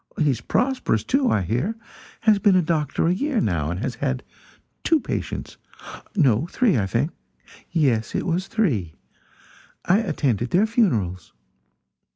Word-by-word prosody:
He 150 -3 +3
is 120 -2 -3
prosperous, 260 - 0
too, 270 -1 +1
I 105 - +2
hear; 125 - -1 0.4
has 215 -3 +4
been 195 -1 +4
a 180 - +4
doctor 155 -3 0
a 170 - +3
year, 275 +5 0
now, 80 - 0
and 90 +2 -3
has 125 - -2
had 130 -2 -2 0.6
two 325 -2 +3
patients - - -5 0.6
no, 140 - +3
three, 225 +1 +2
I 100 -5 +1
think; 125 - 0 0.6
yes, 125 -9 +1
it - - -1
was 180 +2 -1
three. 120 - 0 0.9
I 190 +4 +4
attended 140 - -1
their 185 - +3
funerals. 115 - 0
155 Hz, 150 wpm, -23 LUFS, -, 0.9 s, has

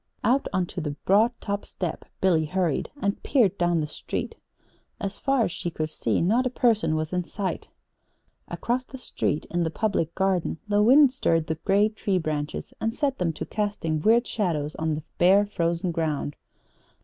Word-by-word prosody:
Out 260 +5 +2
on 185 -2 +1
to 175 - -6
the 150 -2 -3
broad 215 +5 +5
top 200 0 -3
step 180 -4 -5 0.2
Billy 170 -4 +3
hurried, 175 -1 -1
and 200 0 0
peered 225 -9 +3
down 175 -2 +2
the - - -1
street. 150 - -4 0.7
As 195 0 -4
far 270 -3 +2
as 175 - -1
she 175 - -3
could 155 -2 -3
see - - 0
not 230 +9 +2
a - - -1
person 230 -9 +2
was 155 +2 -2
in 180 0 0
sight. 195 +2 -4 0.8
Across 250 +2 -2
the 265 - -9
street 155 - -2
in 175 - 0
the 165 - +1
Public 165 -2 -1
Garden 190 -4 0
the 205 0 +3
wind 260 +4 +6
stirred 165 - +1
the 160 - -1
gray 205 +1 +4
tree 215 -3 -1
branches 155 -3 -3
and 225 +1 -1
set 280 -2 -1
them 175 -2 +1
to - - -5
casting 205 -7 -2
weird 230 +6 +4
shadows 160 -10 -1
on 160 -1 0
the 150 - -6 0.2
bare, 195 +4 +6
frozen 170 -3 -1
ground. 155 -3 -2
185 Hz, 185 wpm, -26 LUFS, 160-215 Hz, 0.8 s, wind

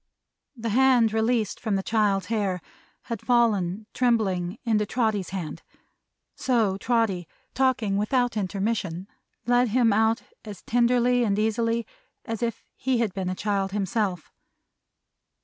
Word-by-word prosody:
The 230 0 -3
hand 245 -1 +4
released 225 -1 0
from 215 -3 -1
the 195 - -1
child's 205 -3 +1
hair, 200 -5 -1 0.4
had 230 -3 -5
fallen, 215 -5 +1
trembling, 205 -6 +1
into 220 -3 +2
Trotty's 215 -3 -1
hand. 185 -5 -5 0.7
So 225 -7 +1
Trotty, 215 -7 0 0.3
talking 235 -7 +1
without 245 +3 +1
intermission, 195 -2 -2 0.4
led 245 +1 +3
him 230 -1 +3
out 220 +2 +2 0.2
as 205 -4 -9
tenderly 245 +1 +3
and 205 -3 +1
easily 230 +1 0 0.4
as 225 -2 -4
if 230 -2 -2
he 260 -1 0
had 230 -5 0
been 190 -1 -3
a 185 - -2
child 195 -1 -1
himself. 195 -3 -2
220 Hz, 130 wpm, -25 LUFS, 195-235 Hz, 0.7 s, hand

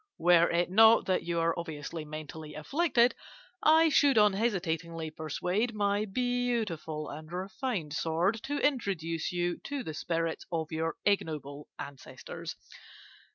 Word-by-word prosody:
Were 170 -1 +5
it 175 +1 +1
not 225 +3 +7
that 185 -1 +1
you 170 0 -1
are 165 0 +2
obviously 160 -1 -6
mentally 155 0 -8
afflicted, 250 - +2 0.5
I 320 +1 +6
should 280 -4 +4
unhesitatingly 170 -7 +1
persuade 180 - -2
my 205 0 +1
beautiful 220 -9 -2
and 155 +2 -9
refined 190 - -3
sword 165 +8 0
to 290 +1 -2
introduce 190 - -1
you 175 0 -1
to 280 -2 -3
the 160 - -5
spirits 165 +2 -2
of 160 -1 -2
your 160 +1 -1
ignoble 150 -7 -1
ancestors. 140 -1 -8
175 Hz, 125 wpm, -30 LUFS, 160-220 Hz, 0.5 s, not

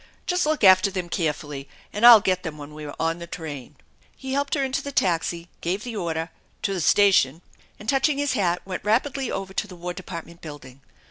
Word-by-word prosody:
Just 360 -3 +1
look 310 -5 0
after 185 0 +7
them 185 -3 -4
carefully 150 -5 -3 0.2
and 210 - -4
I'll 230 -3 +10
get 185 -2 +1
them 160 -4 -6
when 145 0 -10
we 150 0 -8
are 145 - -7
on 165 +1 0
the 170 - -8
train." 150 -5 -7 0.4
He 265 -1 -5
helped 280 +1 0
her 280 - 0
into 265 0 -1
the 280 - -6
taxi, 170 -5 0
gave 190 +5 -2
the 240 -2 -6
order, 165 -3 -3 0.2
" - - -38
To 200 - 0
th* 190 -3 -2
station," 175 -6 +4 0.4
and 210 - -11
touching 275 +3 +2
his 285 -2 0
hat, 180 -6 0
went 185 -1 -5
rapidly 260 +5 0
over 190 0 -4
to 205 - -2
the 185 - -11
Wai 175 +1 -5
Department 170 -2 -9
Building. 140 -4 -11
185 Hz, 215 wpm, -24 LUFS, 165-225 Hz, 0.4 s, I'll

